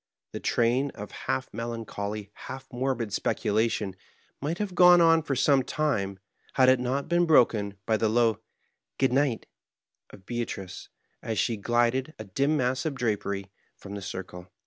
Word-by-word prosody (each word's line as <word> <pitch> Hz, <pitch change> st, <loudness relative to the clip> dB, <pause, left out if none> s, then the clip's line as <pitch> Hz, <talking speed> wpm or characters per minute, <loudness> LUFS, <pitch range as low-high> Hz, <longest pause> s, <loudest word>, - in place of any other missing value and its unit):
The -, -, -5 dB
train 120 Hz, +4 st, +1 dB
of 105 Hz, -2 st, -8 dB
half 65 Hz, -, -3 dB
melancholy, 105 Hz, -3 st, -5 dB
half 135 Hz, 0 st, -8 dB
morbid 120 Hz, -4 st, -2 dB
speculation 105 Hz, -2 st, 0 dB, 0.5 s
might 155 Hz, +5 st, -2 dB
have 205 Hz, -2 st, -3 dB
gone 180 Hz, 0 st, +7 dB
on 165 Hz, -1 st, +5 dB
for 145 Hz, -3 st, -2 dB
some 135 Hz, +1 st, +4 dB
time, 125 Hz, -9 st, -1 dB, 0.4 s
had 130 Hz, -1 st, +5 dB
it 130 Hz, -1 st, +5 dB
not 130 Hz, +3 st, -1 dB
been 175 Hz, +1 st, +2 dB
broken 110 Hz, -9 st, +3 dB
by 110 Hz, 0 st, +2 dB
the 110 Hz, 0 st, +1 dB
low 115 Hz, -1 st, +2 dB, 0.6 s
"Good 130 Hz, -, +2 dB
night" 135 Hz, -3 st, +1 dB, 0.6 s
of 95 Hz, -, -15 dB
Beatrice^ 115 Hz, -6 st, -5 dB, 0.3 s
as 110 Hz, -2 st, -3 dB
she 115 Hz, -, +1 dB
glided, 120 Hz, +6 st, 0 dB
a 110 Hz, -, -6 dB
dim 140 Hz, +10 st, 0 dB
mass 130 Hz, 0 st, 0 dB
of 155 Hz, -3 st, -2 dB
drapery, 100 Hz, -5 st, -2 dB, 0.3 s
from 100 Hz, -, -10 dB
the 100 Hz, -, -5 dB
circle. 90 Hz, -1 st, -7 dB
120 Hz, 155 wpm, -27 LUFS, 105-135 Hz, 0.6 s, gone